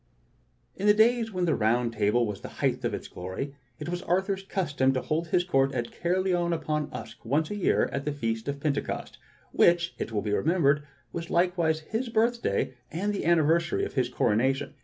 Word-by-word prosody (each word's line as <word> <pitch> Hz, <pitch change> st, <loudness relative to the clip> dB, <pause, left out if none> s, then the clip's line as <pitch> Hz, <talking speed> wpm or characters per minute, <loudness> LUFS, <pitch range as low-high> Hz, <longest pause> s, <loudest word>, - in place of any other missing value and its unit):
' -, -, -40 dB
*J|[N 200 Hz, -, 0 dB
the 210 Hz, -, +7 dB
days 225 Hz, +1 st, +3 dB
when 180 Hz, -2 st, 0 dB
the 160 Hz, -, +2 dB
Round 115 Hz, +2 st, +1 dB
Table 110 Hz, +2 st, +2 dB
was 105 Hz, -2 st, -4 dB
at -, -, -22 dB
the -, -, -6 dB
height -, -, 0 dB
of -, -, 0 dB
its -, -, -7 dB
\m -, -, -23 dB
glory, 95 Hz, +10 st, -5 dB, 0.2 s
it -, -, -7 dB
was 175 Hz, +1 st, -3 dB
Arthur's 190 Hz, +2 st, 0 dB
custom 145 Hz, -9 st, 0 dB
to 130 Hz, -, -1 dB
hold 160 Hz, +2 st, -1 dB
his 175 Hz, +2 st, +2 dB
court 135 Hz, -6 st, +1 dB
at 120 Hz, -2 st, -2 dB
Caerleon 175 Hz, 0 st, 0 dB
^ -, -, +2 dB
Upon 150 Hz, -2 st, -2 dB
Usk -, -, -8 dB
once 150 Hz, -, 0 dB
a -, -, -2 dB
year 200 Hz, -, +2 dB
at 140 Hz, -, -3 dB
the 150 Hz, -, 0 dB
Feast 115 Hz, -5 st, -3 dB
of 140 Hz, 0 st, -3 dB
Pentecost, 140 Hz, -1 st, -3 dB, 0.3 s
which, 170 Hz, 0 st, +3 dB
it -, -, -3 dB
will 105 Hz, -2 st, -1 dB
be 105 Hz, -1 st, -1 dB
remembered, 150 Hz, -, +3 dB, 0.3 s
was 170 Hz, 0 st, -5 dB
likewise 170 Hz, -3 st, +2 dB
his 225 Hz, +9 st, -3 dB
birthday 230 Hz, -, +1 dB, 0.2 s
and 200 Hz, +6 st, -1 dB
the 200 Hz, -, -3 dB
anniversary 165 Hz, 0 st, +3 dB
of -, -, -7 dB
his 125 Hz, -3 st, +1 dB
coronation. 125 Hz, +4 st, +1 dB
155 Hz, 210 wpm, -27 LUFS, 130-180 Hz, 0.3 s, the